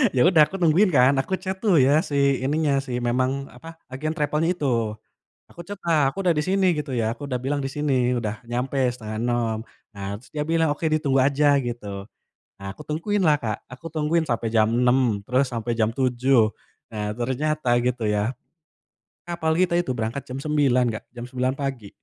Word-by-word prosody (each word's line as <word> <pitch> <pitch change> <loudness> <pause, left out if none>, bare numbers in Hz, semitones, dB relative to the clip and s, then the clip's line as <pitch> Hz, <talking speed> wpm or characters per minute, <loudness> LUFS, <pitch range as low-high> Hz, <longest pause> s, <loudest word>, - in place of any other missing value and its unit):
Ya 125 - +3
udah 170 -4 +5
aku - - -8
nungguin 175 +5 +4
kan. 130 0 +5
Aku 160 - -6
chat 190 0 -4
tuh 200 -7 +3
ya 140 +4 +4
si 140 -2 +1
ininya, 145 0 +1
si 125 -2 -4
memang 130 +3 0
apa, 165 +6 -12
agen 155 +4 -3
travel-nya 155 +3 0
itu. 115 -8 0 0.5
Aku 170 - -10
chat-lah, 165 -8 +1
"Aku 195 - -5
udah 175 -3 +3
di 150 - 0
sini," 185 -2 +2
gitu 150 -2 -4
ya. 115 -1 0
Aku 145 - -11
udah 125 - -1
bilang, 140 +3 -2
"di 135 - -2
sini 135 -4 +1
udah 110 -1 -4
nyampe 125 +3 -2
5.30," 115 0 -2 0.4
Nah, 100 0 -5
terus - - -19
dia 150 -1 -1
bilang, 165 0 +2
"oke, - - -13
ditunggu 140 -3 +2
aja," 145 +1 +3
gitu. 105 -5 -5 0.6
Nah, 100 - -8
aku - - -11
tungguinlah, 165 0 +1
Kak, 110 -3 -3
aku 130 +6 -10
tungguin 160 +1 +1
sampai 115 -1 -1
jam 110 -1 +4
6.00, 125 -3 +2
terus 130 +2 +2
sampai 120 0 -2
jam 110 -1 +2
7.00. 125 -3 +2 0.4
Nah, 105 -1 -3
ternyata 130 +2 0
gitu 125 -1 -1
ya, 105 +3 0 0.9
kapal 170 -2 -1
kita 175 -1 +2
itu 175 - -1
berangkat 115 +5 -3
jam 130 - -6
9.00, 140 -4 +2
Kak, 110 - -6
jam 120 - -6
9.00 130 0 -1
pagi. 135 -7 -4
135 Hz, 185 wpm, -24 LUFS, 120-155 Hz, 0.9 s, udah